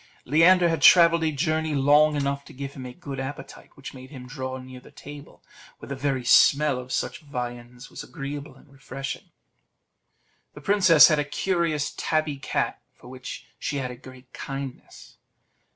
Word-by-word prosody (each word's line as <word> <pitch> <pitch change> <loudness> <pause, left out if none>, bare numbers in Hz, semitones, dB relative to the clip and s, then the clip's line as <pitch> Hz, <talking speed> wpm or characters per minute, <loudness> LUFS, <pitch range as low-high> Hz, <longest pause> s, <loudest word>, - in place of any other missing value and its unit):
Leander 170 +5 +5
had 165 -3 -1
travelled 170 +2 +6
a 160 - +1
journey 155 +1 -1
long 145 +2 +4
enough 140 0 -2
to - - -14
give 140 +1 -7
him 130 -2 -8
a - - -8
good 135 +1 -8
appetite, 135 0 -8
which 140 - -10
made 130 -1 -12
him 130 -4 -10
draw 130 0 -6
near 130 0 -11
the - - -17
table, 145 0 -13 0.3
where - - -12
the 140 - -4
very 130 -2 -2
smell 140 +2 +4
of 125 0 -10
such - - -2
viands 125 -3 -7
was - - -8
agreeable 140 -2 -7
and 135 +1 -21
refreshing. 135 0 -7 1.3
The - - -11
princess 185 -7 +6
had 155 -2 +2
a - - +1
curious 165 -1 -1
tabby 155 -2 -1
cat, 135 - -3
for 125 - -15
which 130 0 -9
she 145 - -3
had 130 -2 -3
a - - -8
great 130 0 -15
kindness. 135 -2 -8
140 Hz, 170 wpm, -25 LUFS, 130-155 Hz, 1.3 s, travelled